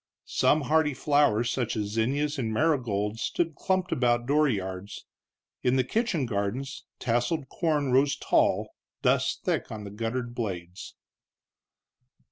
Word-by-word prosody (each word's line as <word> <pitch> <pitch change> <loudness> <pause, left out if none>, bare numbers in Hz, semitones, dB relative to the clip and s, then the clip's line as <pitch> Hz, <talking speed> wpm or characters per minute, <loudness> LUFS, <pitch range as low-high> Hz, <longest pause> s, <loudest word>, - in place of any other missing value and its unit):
Some 155 - +2
hardy 150 -1 +2
flowers, 125 -5 +2
such 120 -3 -1
as 105 -1 -2
zinnias 140 +7 0
and 115 -3 -1
marigolds, 115 -6 0
stood 165 +4 -1
clumped 185 +5 -1
about 120 -1 +2
dooryards; 105 -9 -1 0.6
in 125 +1 +2
the 130 - +3
kitchen 195 - 0
gardens 115 +5 -3
tasseled 125 +4 -1
corn 150 -5 0
rose 135 +2 +4
tall, - - +1 0.3
dust - - +2
thick - - -1
on 105 -1 -6
the 100 - -8
guttered 115 +3 -3
blades. 90 -6 -5
125 Hz, 125 wpm, -27 LUFS, 110-145 Hz, 0.6 s, rose